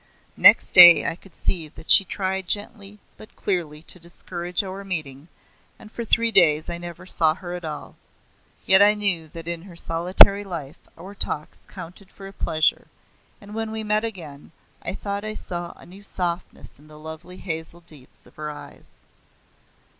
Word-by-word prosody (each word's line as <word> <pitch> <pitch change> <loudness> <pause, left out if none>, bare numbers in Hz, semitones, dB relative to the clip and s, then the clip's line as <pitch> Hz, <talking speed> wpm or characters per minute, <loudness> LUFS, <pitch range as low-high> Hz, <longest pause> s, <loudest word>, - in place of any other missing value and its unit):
Next - - +7
day 175 -3 +10
I - - -3
could 190 +1 -20
see 165 -4 -3
that 155 - -4
she - - +8
tried 190 0 -4
gently 205 +1 -4 0.2
hut 215 - -15
clearly 160 -6 -4
to 180 - -18
discourage 175 +1 -6
our 195 +1 -8
meeting 155 -6 -2 0.5
and 215 - -15
for 235 - -6
three 230 +1 +1
days 155 -6 +3
I 170 - -4
never 175 +1 -10
saw 160 -3 +1
her 175 -1 -8
at 180 0 -7
all. 155 -2 -8 0.7
Yet 190 +1 +5
I 205 +1 +5
knew 195 -6 -2
that 165 +1 -11
in 170 -1 -5
her 180 -1 -14
solitary 180 +5 +4
life 165 -6 -8 0.2
our 185 +4 -11
talks 155 -6 -7
counted 185 +3 -12
for 195 - -12
a 195 - -12
pleasure, 155 -4 -1 0.5
and 205 0 -13
when 225 0 -4
we 220 0 -5
met 210 +1 0
again 160 -12 -9 0.3
I - - -5
thought 200 0 -5
I 215 0 -6
saw 175 -3 -5
a - - -17
new 190 +3 -15
softness 180 -7 -6
in 150 - -20
the 155 0 -15
lovely 160 +4 -11
hazel 160 -1 -7
deeps 155 -6 -7
of - - -22
her 150 0 -6
eyes. 150 - -13
175 Hz, 175 wpm, -22 LUFS, 160-200 Hz, 0.7 s, day